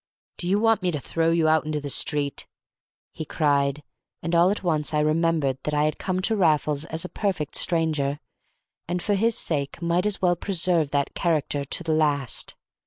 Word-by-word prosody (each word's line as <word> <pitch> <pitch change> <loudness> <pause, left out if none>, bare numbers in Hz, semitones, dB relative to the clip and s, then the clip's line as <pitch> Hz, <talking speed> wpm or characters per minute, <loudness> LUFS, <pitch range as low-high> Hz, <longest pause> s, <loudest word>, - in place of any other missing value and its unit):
"Do 175 - -5
you 195 +3 +2
want 225 -1 +3
me 180 - 0
to 155 -4 -2
throw 165 +4 0
you 165 -1 +2
out 155 0 +3
into 155 -1 -2
the 145 -1 -4
street?" 145 0 0 0.6
he - - -6
cried; 145 -1 0 0.4
and 170 - -3
all 170 +2 +5
at 200 -1 -2
once 155 -3 0
I - - +3
remembered 155 -3 +1
that 150 - -2
I 150 - +2
had 155 0 -1
come 185 -1 -1
to 220 - +3
Raffles 155 -5 +1
as 160 +2 -4
a - - -3
perfect 180 -7 -3
stranger, 155 -4 0 0.7
and 175 +1 -1
for 205 +4 0
his 225 +3 +2
sake 145 -4 -2
might 170 +3 +1
as 210 - 0
well 175 -1 +2
preserve 175 -4 0
that 140 -1 -1
character 150 -4 0
to 175 - -2
the 160 -2 0
last. 145 -5 0
160 Hz, 195 wpm, -24 LUFS, 150-180 Hz, 0.7 s, all